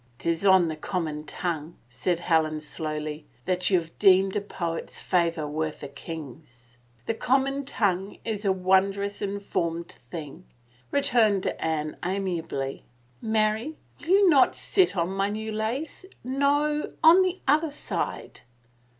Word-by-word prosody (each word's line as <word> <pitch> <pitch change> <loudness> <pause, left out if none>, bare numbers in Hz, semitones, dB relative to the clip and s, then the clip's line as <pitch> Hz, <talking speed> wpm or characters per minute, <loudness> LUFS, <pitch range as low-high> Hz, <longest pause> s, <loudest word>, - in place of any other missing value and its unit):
Tis 170 +4 -1
on 190 -3 +6
the 160 - -3
common 155 -2 -3
tongue," 165 -2 -4
said 165 +8 -2
Helen 160 -3 +2
slowly, 155 0 -5 0.2
that 185 0 +1
you 185 -3 +4
have 165 -1 -11
deemed 190 -1 +5
a 210 - +1
poet's 170 -4 -5
favor 170 -4 0
worth 155 +1 -3
a - - -4
king's." 140 -4 -10 0.3
The - - 0
common 270 +4 +1
tongue 195 -5 -1
is 215 -2 -3
a 195 - +3
wondrous 195 +2 +1
informed 185 -4 -2
thing," 150 +6 -9 0.4
returned 225 -8 +3
Anne 155 -1 -2
amiably. 175 -7 -3 0.2
" 125 -1 -35
Mary, 220 +6 0 0.2
will - - -12
you 390 +2 +5
not 285 -7 +5
sit 370 - +2
on 170 +1 +1
my 195 +1 0
new 220 +1 -4
lace?... 250 - -3 0.2
No 290 +3 +1
— - - -35
on 335 +4 +8
the 370 0 0
other 305 +3 +3
side." 290 - -4
190 Hz, 140 wpm, -26 LUFS, 160-220 Hz, 0.4 s, on